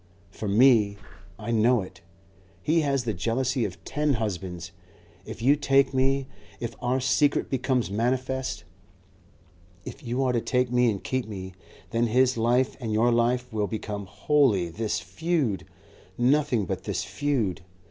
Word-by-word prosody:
For 105 - -6
me 105 -1 +4 0.4
I 110 +2 -5
know 115 +1 +3
it 90 - -13 0.6
he 160 +2 +3
has 140 -3 0
the 115 -2 -1
jealousy 120 +6 0
of 95 -2 -7
ten 150 0 0
husbands. 90 -5 -4 0.6
If - - -7
you 140 +4 +5
take 135 -2 +3
me 135 +1 +2 0.3
If 115 -1 -4
our 125 +1 +1
secret 140 +2 +2
becomes 130 -4 0
manifest 130 0 -1 1.2
If 140 - -8
you 125 0 -1
are 130 -1 +1
to 120 - +1
take 125 0 0
me 125 -1 +4
and 100 -3 -3
keep 130 -2 -2
me, 95 -3 -7 0.4
then 115 +1 +1
his 130 +3 +3
life 120 +3 +2
and 115 -4 -4
your 115 +3 +3
life 120 +1 +1
will 105 -2 0
become 105 -2 -5
wholly 105 - +2
this 110 +5 -2
Feud, 100 - -1 0.5
nothing 125 -3 +2
but - - -4
this - - -2
Feud. 120 -10 -1
120 Hz, 150 wpm, -26 LUFS, 105-130 Hz, 1.2 s, you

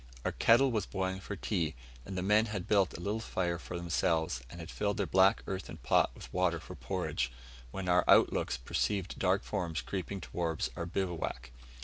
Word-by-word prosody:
Our - - +1
kettle 125 +4 +5
was 105 -5 -1
boiling 95 0 -2
for 100 +1 -6
tea, 85 - -1 0.3
and 95 - -5
the 90 - -1
men 105 +3 +4
had 100 -4 -4
built 100 -5 +3
a - - -9
little 100 +5 -1
fire 90 -6 -1
for 90 - -6
themselves, 80 -5 0
and 85 - -10
had 85 0 -7
filled 105 +1 -1
their 100 - +1
black 95 +1 +4
earthen 95 -1 -5
pot - - +3
with - - -11
water 90 -2 +2
for - - -9
porridge, 60 0 -2 0.4
when 95 +7 -5
our 90 0 +4
look - - +7
outs - - -1
perceived 95 - -1
dark 95 +1 +2
forms 85 - -2
creeping 95 +7 -4
towards 85 -3 -2
our 85 - -4
bivouac. 90 -8 -3
90 Hz, 195 wpm, -32 LUFS, 85-100 Hz, 0.4 s, look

